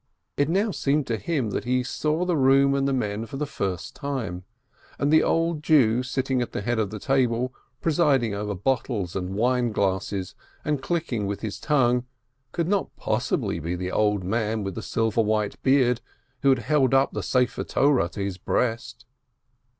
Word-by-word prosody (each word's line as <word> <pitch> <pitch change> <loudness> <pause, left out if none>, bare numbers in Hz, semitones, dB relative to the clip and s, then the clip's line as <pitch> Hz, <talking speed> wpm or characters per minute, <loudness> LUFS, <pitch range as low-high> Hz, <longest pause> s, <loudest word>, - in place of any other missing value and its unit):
It 145 +1 +1
now 200 +5 +1
seemed 145 -4 0
to 115 - -1
him 135 -5 -1
that - - -2
he 125 +1 +1
saw 155 +6 -1
the 180 -2 +1
room 135 0 +4
and 140 0 +1
the - - +1
men 110 -3 -2
for 135 - -7
the 150 - -1
first 95 - -4
time, 115 -11 -4 0.5
and 145 +2 +1
the 160 - +7
old 165 -2 +1
Jew 125 -7 +4
sitting 130 0 -1
at 120 - -4
the - - -2
head 120 +1 0
of 105 -3 0
the 110 - -6
table, 125 0 +1 0.3
presiding 145 -9 +2
over 105 0 -3
bottles 105 -3 -1
and 95 0 -3
wine 120 +2 +1
glasses, 95 -1 -1 0.3
and 150 -2 0
clicking 135 - -1
with 100 0 -4
his 110 -3 -4
tongue, 125 -4 +2 0.4
could 170 +3 -1
not 200 +1 -1
possibly - - -1
be 85 +4 -3
the 90 +1 -4
old 105 -2 +1
man 110 +2 -1
with 95 -1 -3
the - - -5
silver 115 0 0
white 105 -1 -1
beard 130 -3 +3 0.4
who 140 - +4
had 135 - +5
held 130 +3 +2
the 135 - +4 0.2
scroll 125 -1 +2
of 125 - -4
the - - -4 0.2
Law - - 0
to 90 +3 -7
his 95 -2 -4
breast. 120 +3 -2
125 Hz, 190 wpm, -25 LUFS, 105-140 Hz, 0.5 s, the